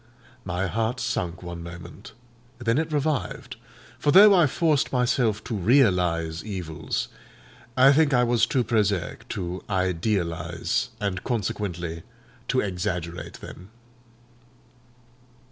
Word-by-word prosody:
My 90 +1 -1
heart 115 +5 -1
sunk 90 -7 -3
one 85 -1 -6
moment, 85 +4 -10 0.4
then 120 +2 +1
it 160 0 -2
revived; 150 -1 -2 0.4
for 150 - 0
though 200 +6 +9
I 175 -5 +5
forced 155 0 +1
myself 125 -4 +1
to 115 - -4
realise 90 - +2
evils, 90 -7 -4 0.7
I 135 +2 +7
think 150 0 +3
I 125 -2 +4
was 120 -1 +2
too 130 - +1
prosaic 105 -6 -1
to 90 -1 -4
idealise, 85 -3 -1
and 100 -3 -2
consequently 90 -8 -3 0.5
to - - +2
exaggerate 90 -3 -4
them. 95 +3 -11
100 Hz, 110 wpm, -25 LUFS, 85-125 Hz, 0.7 s, though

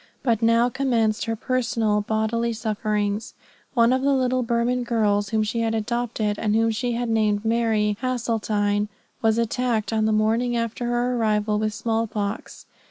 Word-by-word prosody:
But 230 -4 +1
now 230 +1 +4
commenced 235 -4 0
her 225 -1 -1
personal, 230 -3 0
bodily 220 +2 -1
sufferings. 215 0 -2 0.4
One 235 0 +4
of 260 - +1
the 280 +1 +2
little 255 -1 +1
Burman 235 +1 0
girls 210 -4 +1
whom 220 -1 +1
she 225 +2 -2
had 225 -1 0
adopted, 220 -2 -2
and 210 -1 +1
whom 225 0 +3
she 240 +2 -2
had 240 +1 -2
named 215 -2 +1
Mary 220 -2 +1
Hasseltine, 215 -5 0 0.3
was 225 0 +2
attacked 230 -2 0
on 220 -1 +1
the 220 - +2
morning 225 +3 +1
after 230 +1 -2
her 240 +1 0
arrival 210 -2 +1
with 215 -1 -1
small 225 0 -1
pox. 205 0 -5
225 Hz, 165 wpm, -23 LUFS, 215-240 Hz, 0.4 s, now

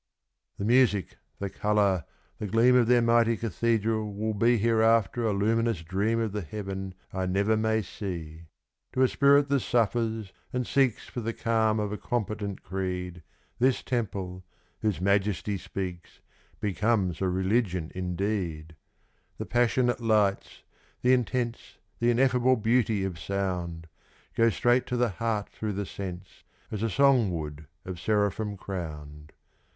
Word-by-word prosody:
The 100 - -3
music, 115 -5 +3 0.2
the 100 -1 -4
colour, 100 -5 +1 0.3
the 105 - -3
gleam 115 +5 +4
of 120 -2 +4
their 120 -1 +4
mighty 115 -1 +3
cathedral 110 -1 0
will 110 +2 -2
be 115 +4 +3
Hereafter 115 0 +3
a - - +2
luminous 110 -1 +1
dream 100 +7 0
of 110 -2 -1
the 105 +1 -3
heaven 95 +1 -6 0.2
I 95 0 -1
never 100 +4 +2
may 110 0 +1
see; 85 -5 -7 0.5
To 130 - +3
a - - +6
spirit 140 +2 +4
that 140 -1 +3
suffers 115 -3 0 0.2
and 125 0 -1
seeks 135 -3 +1
for 120 - -5
the 115 +1 -2
calm 110 -2 +1
of 105 -1 -2
a 105 - -4
competent 105 -4 -3
creed, 90 -1 -4 0.4
This 130 +1 +2
temple, 95 -7 -3 0.4
whose 105 -6 -1
majesty 100 +1 +1
speaks, 95 -2 -6 0.4
becomes 100 -3 0
a 95 - +1
religion 95 -2 0
indeed; 90 -3 -3 0.6
The - - -4
passionate 120 0 +2
lights 105 -3 +1 0.4
the 125 +1 +5
intense, 120 -1 -1 0.2
the 120 - +2
ineffable 125 +1 +3
beauty 115 -2 +1
of 90 -4 -4
sound 90 -2 -3 0.5
Go 115 0 +4
straight 120 +4 +2
to 125 - -1
the 120 -1 +2
heart 105 +1 -2
through 105 -1 -4
the 100 +1 -3
sense, 95 -1 -8 0.3
as 105 - -3
a 115 - +1
song 130 -2 +4
would 75 -1 -7 0.2
of 95 -2 -6
seraphim 105 0 0
crowned. 75 -6 -7
105 Hz, 145 wpm, -28 LUFS, 95-115 Hz, 0.6 s, a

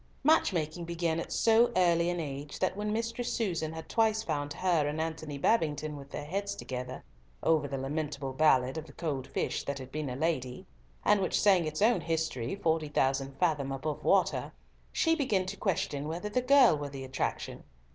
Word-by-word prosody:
Match 315 -3 +4
making 170 0 -2
began 170 -1 -1
at - - -5
so 230 +1 +4
early 170 -1 +3
an 175 0 -1
age, 145 -1 -5
that 185 0 0
when 210 +1 -2
Mistress 230 +2 -2
Susan 170 -8 -1
had 160 0 -8
twice 220 -1 +2
found 145 -5 -2
her 170 -3 +1
and 150 +2 -2
Antony 160 -2 -3
Babington 155 -4 +1
with 140 -1 -10
their 145 - -6
heads 200 +5 -2
together 125 0 -6 0.4
over 155 -3 +3
the 135 0 -4
lamentable 140 0 -3
ballad 135 -1 +3
of 160 - -10
the 140 - -14
cold 140 -5 -3
fish - - -2
that 140 -1 -3
had 130 -1 -9
been 150 -2 -3
a 125 - -4
lady, 130 -4 -2 0.4
and 205 -1 +4
which 185 - +1
sang 190 -5 +4
its 155 +5 -1
own 235 +2 +4
history 160 -6 -2
"forty 160 -5 0
thousand 135 -1 0
fathom 145 -5 +1
above 145 +3 -3
water," - - +2 0.4
she 325 - +2
began 220 - +1
to 185 +2 -5
question 150 -8 -1
whether 175 +6 -4
the 250 +4 +1
girl 255 - +6
were 145 -1 -4
the 135 -1 -7
attraction. 130 0 -3
160 Hz, 190 wpm, -30 LUFS, 140-190 Hz, 0.4 s, girl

